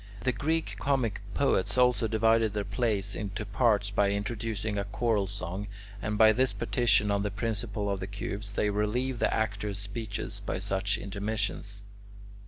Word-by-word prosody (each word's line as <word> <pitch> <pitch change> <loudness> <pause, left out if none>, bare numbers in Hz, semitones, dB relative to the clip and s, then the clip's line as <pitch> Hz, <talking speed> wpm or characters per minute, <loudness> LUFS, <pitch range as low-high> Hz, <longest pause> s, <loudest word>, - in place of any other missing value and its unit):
The 130 - +2
Greek 160 +7 -1
comic 130 -6 0
poets, - - +2
also, 125 -2 +4
divided 110 0 +3
their 105 -1 -1
plays 100 -1 0
into 105 +1 -4
parts 105 -1 +2
by 100 -1 +3
introducing 105 +1 -2
a - - 0
choral 105 0 0
song, 95 0 -4 0.3
and 105 +1 -1
by 110 0 +8
this 130 +4 +2
partition 110 -4 +2
on 100 0 +2
the 105 - 0
principle 105 0 -2
of 100 -1 -1
the 95 - -4
cubes, 100 +1 -4
they 105 0 +1
relieve 115 +5 0
the - - +2
actor's 105 -2 -1
speeches 105 +1 -3
by - - -3
such 100 +2 0
intermissions. 100 -1 -3
105 Hz, 160 wpm, -29 LUFS, 100-115 Hz, 0.3 s, by